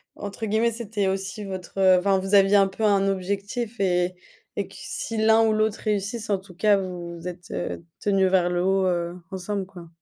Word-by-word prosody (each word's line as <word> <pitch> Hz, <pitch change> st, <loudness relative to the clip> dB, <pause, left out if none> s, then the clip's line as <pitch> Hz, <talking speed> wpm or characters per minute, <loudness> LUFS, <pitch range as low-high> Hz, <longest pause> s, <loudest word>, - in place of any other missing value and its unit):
Entre 205 Hz, +2 st, -5 dB
guillemets, 220 Hz, +2 st, +2 dB
c'était 210 Hz, -3 st, -2 dB
aussi 195 Hz, +2 st, -3 dB
votre 190 Hz, 0 st, -6 dB
heu, 185 Hz, -1 st, +6 dB
enfin, 195 Hz, +1 st, +2 dB
vous 195 Hz, +2 st, +1 dB
aviez 195 Hz, +1 st, +6 dB
un 195 Hz, -1 st, +6 dB
peu 195 Hz, +3 st, -6 dB
un 200 Hz, -2 st, +3 dB
objectif 200 Hz, +4 st, -3 dB
et 180 Hz, -1 st, +1 dB, 0.4 s
et -, -, -2 dB
que -, -, -16 dB
si 225 Hz, -, -4 dB
l'un 220 Hz, +1 st, +5 dB
ou 220 Hz, -, +3 dB
l'autre 215 Hz, 0 st, +1 dB
réussisse, 215 Hz, +1 st, -2 dB
en 200 Hz, -, +2 dB
tout 190 Hz, -1 st, -14 dB
cas, 205 Hz, +2 st, +3 dB
vous 175 Hz, -2 st, -5 dB
vous 170 Hz, +2 st, -8 dB
êtes, 175 Hz, -1 st, -8 dB
heu, -, -, -4 dB, 0.2 s
tenus 195 Hz, -2 st, +2 dB
vers 180 Hz, -2 st, +3 dB
le 175 Hz, 0 st, 0 dB
haut, 190 Hz, 0 st, +2 dB
heu, 175 Hz, 0 st, -1 dB, 0.2 s
ensemble, 190 Hz, +1 st, -3 dB
quoi. 175 Hz, -3 st, -12 dB
195 Hz, 210 wpm, -25 LUFS, 185-210 Hz, 0.4 s, heu